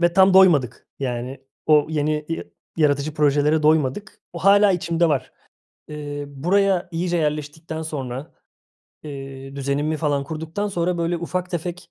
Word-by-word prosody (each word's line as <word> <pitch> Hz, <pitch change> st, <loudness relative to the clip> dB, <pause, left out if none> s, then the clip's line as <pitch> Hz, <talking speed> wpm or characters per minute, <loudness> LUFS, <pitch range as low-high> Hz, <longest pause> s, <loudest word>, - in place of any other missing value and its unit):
ve 175 Hz, 0 st, +3 dB
tam 190 Hz, 0 st, +6 dB
doymadık. 155 Hz, -11 st, +4 dB
Yani, 125 Hz, 0 st, -4 dB, 0.3 s
o 150 Hz, -1 st, +5 dB
yeni 150 Hz, 0 st, 0 dB
ya 165 Hz, -, -3 dB, 0.3 s
yaratıcı 145 Hz, -1 st, +1 dB
projelere 150 Hz, +1 st, +2 dB
doymadık. 155 Hz, +6 st, +1 dB
O 170 Hz, -, -6 dB
hâlâ 200 Hz, +2 st, +5 dB
içimde 170 Hz, -1 st, +1 dB
var. 145 Hz, -4 st, -1 dB, 0.6 s
Iıı, 145 Hz, -1 st, -5 dB
buraya 180 Hz, +6 st, +1 dB
iyice 175 Hz, +1 st, -1 dB
yerleştikten 155 Hz, +1 st, -3 dB
sonra, 140 Hz, -2 st, -5 dB, 0.7 s
eee, 135 Hz, -1 st, -8 dB
düzenimi 140 Hz, +3 st, -1 dB
falan 145 Hz, -3 st, 0 dB
kurduktan 160 Hz, +7 st, -4 dB
sonra, 175 Hz, -2 st, -1 dB
böyle, 170 Hz, +1 st, 0 dB
ufak 180 Hz, +2 st, -3 dB
tefek 175 Hz, 0 st, -5 dB
155 Hz, 135 wpm, -22 LUFS, 145-175 Hz, 0.7 s, tam